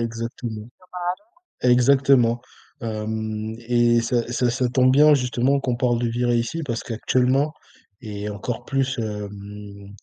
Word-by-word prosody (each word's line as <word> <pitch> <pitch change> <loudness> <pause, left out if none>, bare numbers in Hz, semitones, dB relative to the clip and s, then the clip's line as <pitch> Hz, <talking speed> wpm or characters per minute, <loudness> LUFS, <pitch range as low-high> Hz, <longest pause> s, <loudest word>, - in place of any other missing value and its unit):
Exactement, 115 -1 -5 0.9
exactement, 125 -1 +4 0.4
hem 110 0 -4
et 120 -1 +4
ça, 120 0 -1
ça 125 0 +1
ça 125 +1 0
tombe 130 0 +4
bien, 150 +2 +6
justement, 130 +1 +1
qu'on 125 -2 -1
parle 120 -2 +1
de 120 - +1
virer 120 +1 +1
ici, 120 +8 -2
parce 115 -3 -3
qu'actuellement 130 +5 +1 0.5
et 105 -2 -5
encore 105 +3 -5
plus, 135 0 -1
hem, 105 -1 -7
120 Hz, 125 wpm, -23 LUFS, 110-125 Hz, 0.9 s, bien